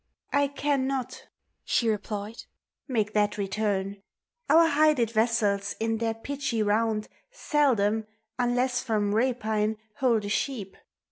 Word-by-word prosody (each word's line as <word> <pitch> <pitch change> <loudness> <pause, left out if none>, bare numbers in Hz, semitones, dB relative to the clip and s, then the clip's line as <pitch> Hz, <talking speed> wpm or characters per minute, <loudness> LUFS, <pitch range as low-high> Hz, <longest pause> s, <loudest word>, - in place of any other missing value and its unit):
1 285 0 +1
cannot, 270 -3 -1 0.4
she 235 - +1
replied, 210 0 -3 0.4
make 215 -6 -1
thai 210 -1 +3
return: 200 -1 -2 0.5
Our 330 +1 +7
hided 295 -6 +3
vessels 215 -3 +1
in 225 0 0
their 225 -1 -1
pitchj 235 -2 -2
round 215 0 +1 0.2
Seldom, 230 - +1 0.3
unless 245 +1 +1
from 210 -4 0
rapine, 220 -2 0 0.2
hold 235 -5 +2
a - - -3
sheep. 205 -4 -2
225 Hz, 115 wpm, -27 LUFS, 210-260 Hz, 0.5 s, Our